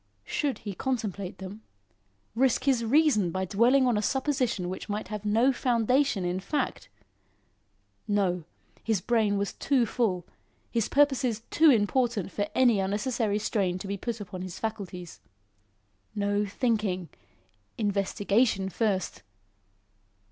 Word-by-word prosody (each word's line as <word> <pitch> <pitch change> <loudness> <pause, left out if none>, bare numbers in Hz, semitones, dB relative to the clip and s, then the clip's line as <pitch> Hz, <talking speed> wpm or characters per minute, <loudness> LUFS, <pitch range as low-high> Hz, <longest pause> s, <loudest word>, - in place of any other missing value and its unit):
Should 285 -3 -1
he 205 - -3
contemplate 200 -5 -3
them? 195 +3 -8 0.7
Risk 255 +2 +2
his 260 -4 +2
reason 235 - +3
by 185 +2 -2
dwelling 240 +8 +4
on 245 -4 +2
a - - +1
supposition 260 -7 0
which 185 +3 -6
might 210 +1 -3
have 210 -1 -5
no 230 +6 +3
foundation 245 -3 +1
in 175 +1 -1
fact? 275 +7 -3 1.2
No. 190 -4 +1 0.4
His 220 -4 +1
brain 215 0 +1
was 200 0 -2
too 265 -4 +1
full 200 -6 -1 0.5
his 230 -3 0
purposes 265 -6 +2
too 320 0 +6
important 230 -3 +2
for 205 0 -2
any 245 -5 +4
unnecessary 210 +2 0
strain 195 -4 0
to 185 - -8
be 200 +1 -2
put 230 +3 -4
upon 185 -2 -7
his 185 -2 -6
faculties. 190 -6 -5 1.0
No 205 0 0
thinking! 200 -6 -1 0.7
investigation 205 0 +1
first. 200 -2 -1
210 Hz, 125 wpm, -28 LUFS, 195-245 Hz, 1.2 s, too